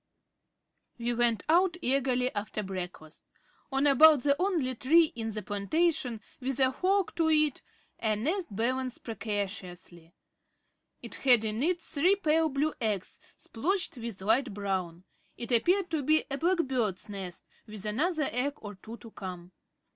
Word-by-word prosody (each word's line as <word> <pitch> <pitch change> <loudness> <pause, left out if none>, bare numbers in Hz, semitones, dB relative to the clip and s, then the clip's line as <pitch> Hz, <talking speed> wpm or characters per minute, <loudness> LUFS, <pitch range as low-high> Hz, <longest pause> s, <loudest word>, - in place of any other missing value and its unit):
We 240 0 -1
went 235 -2 +2
out 350 +2 +3
eagerly 255 -3 +1
after 210 +1 -4
breakfast. 180 -5 -7 0.5
On 270 +1 +1
about 290 -1 +7
the 280 -1 +3
only 335 -10 0
tree 320 +7 +3
in 225 -1 -3
the 215 -1 -4
plantation 245 - 0 0.2
with 265 0 -3
a 260 0 +3
fork 380 +5 +1
to 325 -1 +2
it 305 -3 +3 0.4
a 220 -2 +1
nest 330 - -1
balanced 250 +4 -2
precariously. 190 -6 -5 0.9
It - - -8
had 245 -5 +5
in 215 +2 -2
it 345 +3 0
three 335 +6 +2
pale 320 -3 +2
blue 290 +2 0
eggs 210 -5 -2 0.2
splotched 350 - -2
with 225 -5 -6
light 225 +1 +1
brown. 185 -4 -3 0.3
It 235 +1 -5
appeared 355 - +2
to 315 -3 0
be 310 +3 +3
a 275 - -1
black 355 +3 +2
bird's 230 -8 -2
nest 190 -4 -7 0.2
with 215 -1 -9
another 300 - 0
egg 265 +4 -1
or 205 -6 -9
two 220 +4 -11
to 230 -2 -13
come. 180 -3 -8
250 Hz, 150 wpm, -29 LUFS, 210-310 Hz, 0.9 s, about